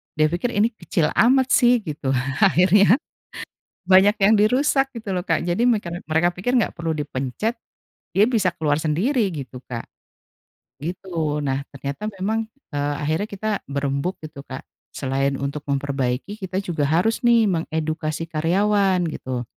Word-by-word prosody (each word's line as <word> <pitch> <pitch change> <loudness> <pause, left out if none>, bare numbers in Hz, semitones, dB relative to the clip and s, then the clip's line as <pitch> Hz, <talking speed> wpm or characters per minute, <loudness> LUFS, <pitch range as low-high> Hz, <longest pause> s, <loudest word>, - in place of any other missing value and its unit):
dia 155 0 +2
pikir 215 +7 -2
ini 220 +3 +3
kecil 190 -7 -1
amat 260 +2 +3
sih 245 -2 +4
gitu 145 -5 -2 0.2
akhirnya, 195 +3 +5 0.9
banyak 190 +2 +7
yang 210 +3 +5
dirusak 270 +5 +2
gitu 215 -6 -4
loh 180 - -2
Kak 165 -4 +1
jadi 175 +7 0
mekar 210 -8 +1
mereka 160 +2 +2
pikir 245 +8 -1
gak 215 - -2
perlu 165 -1 -2
dipencet, 145 - -3 0.5
dia 205 +2 +4
bisa 225 -6 +2
keluar 150 -1 +1
sendiri 190 - +1
gitu, 135 -6 -7
Kak. 115 -2 -5 1.0
Gitu 160 -3 -3
nah 135 -1 0
ternyata 140 +9 -5
memang, 220 +4 -1 0.2
eee, 145 0 -1
akhirnya 155 +8 -1
kita 215 +2 -4 0.2
berembuk 140 +5 -2
gitu 150 -2 -9
Kak 130 -1 -9 0.3
selain 135 0 -1
untuk 140 +2 -4
memperbaiki 140 +6 -2
kita 190 0 -3
juga 165 -6 -1
harus 175 +10 +2
nih 230 -3 +5
mengedukasi 160 -1 -2
karyawan 190 +3 +2
gitu, 130 -4 -4
170 Hz, 145 wpm, -22 LUFS, 145-210 Hz, 1.0 s, banyak